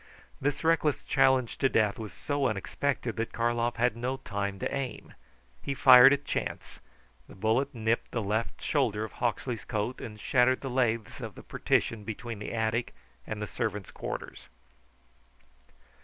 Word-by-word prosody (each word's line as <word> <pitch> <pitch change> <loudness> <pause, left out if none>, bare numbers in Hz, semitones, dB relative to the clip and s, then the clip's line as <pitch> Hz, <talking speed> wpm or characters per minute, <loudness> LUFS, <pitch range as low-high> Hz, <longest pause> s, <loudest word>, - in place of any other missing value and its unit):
This 145 +3 -1
reckless 160 -3 +2
challenge 130 -3 +2
to 135 - +3
death 110 -3 +2
was 110 -2 -6
so 145 -1 -1
unexpected 120 +4 -2
that 115 0 -2
Karlov 120 0 0
had 120 -2 +1
no 125 +3 -2
time 100 -4 -3
to - - -3
aim. 135 -4 -5 0.5
He 140 - -3
fired 130 0 +9
at 145 0 0
chance. - - -4 0.5
The - - -12
bullet 110 +7 0
nipped 115 +1 0
the 115 - -2
left 110 +3 -2
shoulder 105 +1 +1
of 110 - -5
Hawksley's 120 -1 -2
coat 110 +4 -3
and 105 -2 -8
shattered 130 +2 +3
the 135 - -4
laths 115 -4 0
of - - -6
the - - -11
partition 110 -2 0
between 115 +1 -6
the 105 - -5
attic 110 +1 -1 0.3
and 110 - -4
the 105 - -2
servant's 105 -3 -3
quarters. - - -6
115 Hz, 155 wpm, -29 LUFS, 110-130 Hz, 0.5 s, fired